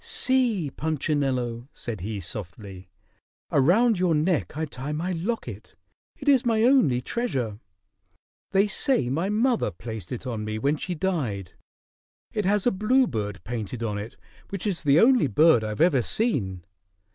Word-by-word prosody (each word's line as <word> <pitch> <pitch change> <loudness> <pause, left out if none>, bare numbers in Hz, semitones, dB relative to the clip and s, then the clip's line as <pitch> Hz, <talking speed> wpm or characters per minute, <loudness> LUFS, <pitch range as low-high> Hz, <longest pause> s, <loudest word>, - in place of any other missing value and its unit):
"See, 235 - +1
Punchinello," 135 -6 -1
said 110 -6 -6
he 105 +2 -4
softly, 95 +1 -7 0.6
"around 200 - +4
your 180 -3 +2
neck 155 -1 0
I 160 - -1
tie 140 0 -6
my 170 +5 -2
locket. 165 - -4 0.4
It 275 - -10
is 270 -4 +5
my 225 -2 +2
only 230 - +4
treasure. 125 - -2 0.9
They 195 +1 +3
say 205 - 0
my 165 +9 -1
mother 230 +3 +1
placed 110 -6 -8
it 125 +1 -5
on 115 -4 -3
me 110 0 -3
when 140 +7 +1
she 180 +3 -4
died. 135 - -2 0.8
It 210 -2 -1
has 205 0 +2
a 245 - +4
bluebird 185 - 0
painted 115 +1 -5
on 105 -2 -2
it 105 +3 -8 0.3
which 195 -1 -5
is 195 -5 -1
the 145 0 +4
only 240 - +5
bird 140 0 +4
I've 110 +5 -3
ever 160 -7 +4
seen. 105 - -1
150 Hz, 150 wpm, -25 LUFS, -, 0.9 s, is